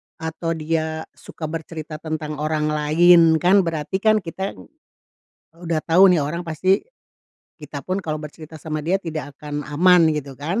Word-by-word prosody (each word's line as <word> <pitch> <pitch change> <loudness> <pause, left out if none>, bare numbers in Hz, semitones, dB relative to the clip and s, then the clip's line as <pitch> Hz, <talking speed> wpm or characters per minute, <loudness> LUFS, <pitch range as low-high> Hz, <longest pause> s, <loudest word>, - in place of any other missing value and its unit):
atau 165 +1 -4
dia 160 0 -2
suka 155 -2 -8
bercerita 160 -1 -6
tentang 155 -2 -5
orang 155 0 0
lain 165 +2 +5
kan, 190 +3 +6
berarti 165 0 -2
kan 215 0 +3
kita 190 +3 -5 1.0
udah 170 -2 -2
tahu 180 +4 +5
nih 165 - +2
orang 170 +5 -3
pasti 185 +5 +1 0.7
kita 150 -3 -8
pun 185 +5 -3
kalau 155 -1 -3
bercerita 155 +1 -10
sama 155 -1 -4
dia 190 +4 +1
tidak 155 -4 -6
akan 150 -1 -5
aman 165 +2 +4
gitu 140 -3 -5
kan, 165 - -2
160 Hz, 155 wpm, -21 LUFS, 150-175 Hz, 1.0 s, kan